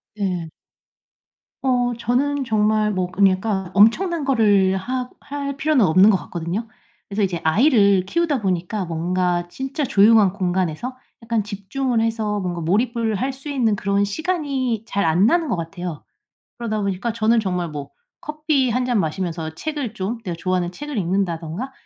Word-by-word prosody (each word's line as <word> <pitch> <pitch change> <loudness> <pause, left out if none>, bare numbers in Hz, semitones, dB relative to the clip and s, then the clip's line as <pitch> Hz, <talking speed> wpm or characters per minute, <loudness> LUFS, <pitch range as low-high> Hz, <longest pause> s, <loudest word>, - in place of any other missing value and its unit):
네. 180 -5 -2 1.1
어. 245 -2 +1
저는 275 +4 0
정말 215 -1 +2
뭐 185 -2 -1
그러니까 190 0 +1
엄청난 310 - +4
거를 205 -8 +3
하 250 +5 -3
할 280 -1 -5
필요는 300 -7 +3
없는 185 +5 +6
것 195 - +4
같거든요. 175 +7 -4 0.4
그래서 205 +1 -2
이제 180 -3 -1
아이를 200 - +4
키우다 320 - 0
보니까 185 +1 -1
뭔가 175 +1 -1
진짜 270 - -4
조용한 215 -5 +5
공간에서 185 +5 -2 0.2
약간 230 -2 -1
집중을 225 +4 -2
해서 220 -2 -1
뭔가 175 -3 -3
몰입을 225 +6 0
할 260 +7 -1
수 270 +3 -9
있는 240 -7 +1
그런 200 0 0
시간이 265 - -2
잘 200 -3 -1
안 165 +5 +3
나는 335 +2 +2
것 - - +1
같아요. 170 -1 -6 0.5
그러다 215 -3 -2
보니까 200 +4 -1
저는 230 +1 +3
정말 180 -5 -2
뭐 145 -2 -7 0.3
커피 300 -3 0
1 250 +2 0
잔 245 -4 +1
마시면서 165 -1 -3
책을 290 - -4
좀 200 +5 -3
내가 175 -4 -4
좋아하는 180 -1 -1
책을 295 +5 -6
읽는다든가 180 +4 -2
210 Hz, 320 characters per minute, -21 LUFS, 185-255 Hz, 1.1 s, 없는